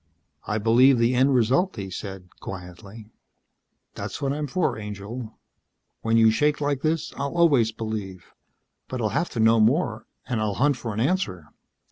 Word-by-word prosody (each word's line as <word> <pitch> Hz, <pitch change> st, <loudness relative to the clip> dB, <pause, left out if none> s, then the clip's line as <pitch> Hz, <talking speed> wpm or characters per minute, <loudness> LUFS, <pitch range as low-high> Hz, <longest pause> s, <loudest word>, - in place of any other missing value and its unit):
"I 105 Hz, -, 0 dB
believe 120 Hz, +5 st, +5 dB
the 115 Hz, +2 st, +2 dB
end 130 Hz, +2 st, +3 dB
result," 130 Hz, -, +2 dB
he 95 Hz, -3 st, -6 dB
said, 95 Hz, -1 st, -7 dB
quietly. 95 Hz, +4 st, -10 dB, 0.8 s
"That's -, -, -6 dB
what 140 Hz, -1 st, -1 dB
I'm 150 Hz, 0 st, -3 dB
for, 170 Hz, +5 st, 0 dB
angel. 105 Hz, +2 st, -7 dB, 0.6 s
When 115 Hz, 0 st, +2 dB
you 110 Hz, -1 st, +6 dB
shake 150 Hz, +6 st, +1 dB
like 145 Hz, -2 st, -1 dB
this 160 Hz, +1 st, -1 dB
I'll 140 Hz, +4 st, -3 dB
always 140 Hz, -10 st, +4 dB
believe. 110 Hz, -5 st, -6 dB, 0.5 s
But 130 Hz, -, -5 dB
I'll 110 Hz, -2 st, 0 dB
have 170 Hz, -, -1 dB
to 115 Hz, -, -5 dB
know 110 Hz, +1 st, +5 dB
more. 110 Hz, -1 st, +1 dB, 0.2 s
And 120 Hz, -4 st, -1 dB
I'll 105 Hz, -2 st, -1 dB
hunt 145 Hz, 0 st, +2 dB
for 115 Hz, -2 st, -5 dB
an -, -, -3 dB
answer." 110 Hz, -, -1 dB
115 Hz, 165 wpm, -24 LUFS, 105-140 Hz, 0.8 s, you